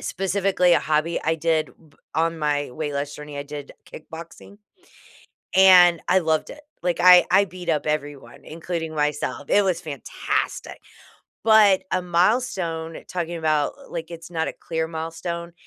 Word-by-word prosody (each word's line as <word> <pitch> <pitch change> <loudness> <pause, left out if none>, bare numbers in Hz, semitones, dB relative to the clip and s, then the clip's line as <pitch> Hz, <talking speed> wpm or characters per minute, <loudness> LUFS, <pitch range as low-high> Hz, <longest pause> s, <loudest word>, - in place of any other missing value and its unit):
specifically 190 -2 +1
a - - +4
hobby 155 +2 0
I 160 +1 +2
did, 160 -1 0 0.2
b - - -27 0.2
on 165 +1 0
my 145 -3 -1
weight 145 +2 -5
loss 140 +1 -3
journey, 150 -1 -9
I 140 - -3
did 145 -1 -9 0.2
kickboxing, 165 +5 -11 1.0
and 180 -3 +7
I 185 +1 +5
loved 160 -3 0
it, 295 - -11 0.2
like, 175 -2 -1
I 180 0 +8
I 200 +2 +4
beat 180 -2 -5
up 150 -1 -1
everyone, 145 -2 -4
including 165 0 -5
myself, 150 -1 -2
it 205 - +4
was 185 -3 0
fantastic, 145 -5 -4 0.6
but 215 -4 +5
a 185 - +1
milestone, 175 -3 0
talking 170 -1 -4
about, 155 -2 0
l - - -16
like, 170 0 -6
it's 165 +1 -9
not 160 -1 -1
a - - -8
clear 160 -1 -1
milestone, 170 +1 -6
165 Hz, 155 wpm, -23 LUFS, 155-180 Hz, 1.0 s, I